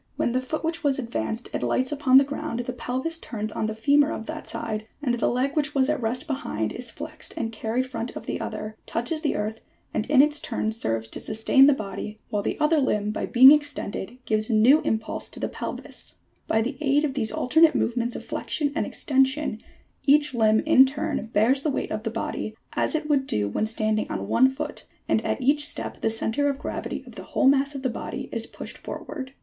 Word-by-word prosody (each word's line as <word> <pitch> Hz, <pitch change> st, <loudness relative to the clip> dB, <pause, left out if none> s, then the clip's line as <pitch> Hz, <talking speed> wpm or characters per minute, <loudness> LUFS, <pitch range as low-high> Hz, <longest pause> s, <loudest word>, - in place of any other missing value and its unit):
When -, -, 0 dB
the 255 Hz, +1 st, 0 dB
foot 310 Hz, +6 st, -4 dB
which 330 Hz, +1 st, -2 dB
was 280 Hz, -2 st, +2 dB
advanced 235 Hz, -2 st, -3 dB
alights 260 Hz, +1 st, 0 dB
upon 275 Hz, -3 st, +5 dB
the 275 Hz, -, +8 dB
ground, 285 Hz, -3 st, -4 dB
the 245 Hz, +1 st, -4 dB
pelvis 260 Hz, +7 st, -3 dB
turns 215 Hz, -6 st, -5 dB
on 215 Hz, -, -2 dB
the 220 Hz, -, -3 dB
femur 285 Hz, +6 st, +3 dB
of 220 Hz, -, -5 dB
that 315 Hz, +3 st, -6 dB
side, 215 Hz, -1 st, -4 dB
and 270 Hz, -5 st, 0 dB
the 240 Hz, -, +1 dB
leg 260 Hz, +3 st, 0 dB
which 295 Hz, -1 st, 0 dB
was 265 Hz, 0 st, +3 dB
at 305 Hz, -3 st, 0 dB
rest 245 Hz, +5 st, -1 dB
behind, 185 Hz, -, -3 dB
is 245 Hz, -1 st, -5 dB
flexed 310 Hz, +5 st, -7 dB
and 225 Hz, -1 st, -2 dB
carried 225 Hz, +3 st, -1 dB
front 255 Hz, -2 st, -5 dB
of -, -, -7 dB
the -, -, -3 dB
other, 215 Hz, 0 st, -5 dB
touches 245 Hz, +7 st, -2 dB
the 300 Hz, -, 0 dB
earth 215 Hz, +2 st, -3 dB, 0.3 s
and 215 Hz, -, -2 dB
in 280 Hz, -2 st, +7 dB
its 295 Hz, 0 st, +2 dB
turn 225 Hz, -5 st, -2 dB
serves 115 Hz, -, -2 dB
to -, -, -6 dB
sustain 225 Hz, +5 st, +4 dB
the 290 Hz, -, +6 dB
body, 210 Hz, -1 st, -6 dB
while 210 Hz, -2 st, 0 dB
the -, -, -3 dB
other 305 Hz, +1 st, +3 dB
limb 210 Hz, -6 st, +1 dB
by -, -, -3 dB
being 260 Hz, +3 st, +9 dB
extended 285 Hz, -7 st, 0 dB
gives 215 Hz, 0 st, 0 dB
a -, -, +1 dB
new 255 Hz, +9 st, +6 dB
impulse 220 Hz, 0 st, -2 dB
to -, -, -8 dB
the -, -, -1 dB
pelvis. -, -, -6 dB, 0.3 s
By 220 Hz, 0 st, +2 dB
the 260 Hz, +3 st, -4 dB
aid 290 Hz, 0 st, +3 dB
of 290 Hz, -3 st, 0 dB
these 225 Hz, -5 st, 0 dB
alternate 320 Hz, +5 st, +4 dB
movements 240 Hz, 0 st, 0 dB
of -, -, -6 dB
flexion 290 Hz, -2 st, -2 dB
and 315 Hz, -, -1 dB
extension 265 Hz, -4 st, +1 dB, 0.5 s
each 290 Hz, 0 st, +4 dB
limb 220 Hz, -2 st, +4 dB
in 270 Hz, -4 st, +6 dB
turn 290 Hz, -3 st, -3 dB
bears 230 Hz, +5 st, +2 dB
the 305 Hz, -, 0 dB
weight 275 Hz, -, -2 dB
of 215 Hz, -, -2 dB
the 225 Hz, -, -2 dB
body, 220 Hz, -1 st, -4 dB, 0.2 s
as -, -, 0 dB
it 305 Hz, -1 st, -2 dB
would 280 Hz, -3 st, +2 dB
do 105 Hz, -1 st, 0 dB
when 160 Hz, -, -1 dB
standing 215 Hz, -1 st, -1 dB
on 100 Hz, 0 st, -3 dB
one 250 Hz, -, +5 dB
foot, 295 Hz, +2 st, -6 dB, 0.2 s
and -, -, +2 dB
at -, -, -1 dB
each 285 Hz, +3 st, +2 dB
step -, -, -4 dB
the 225 Hz, -, +2 dB
centre 225 Hz, +5 st, 0 dB
of 280 Hz, -, -2 dB
gravity 295 Hz, -, -5 dB
of -, -, -12 dB
the -, -, -8 dB
whole 270 Hz, -, +5 dB
mass 280 Hz, +1 st, +3 dB
of 270 Hz, -, -5 dB
the -, -, +2 dB
body 245 Hz, -, -5 dB
is -, -, -2 dB
pushed -, -, -8 dB
for -, -, -6 dB
ward. 260 Hz, -2 st, -6 dB
255 Hz, 225 wpm, -25 LUFS, 220-290 Hz, 0.5 s, being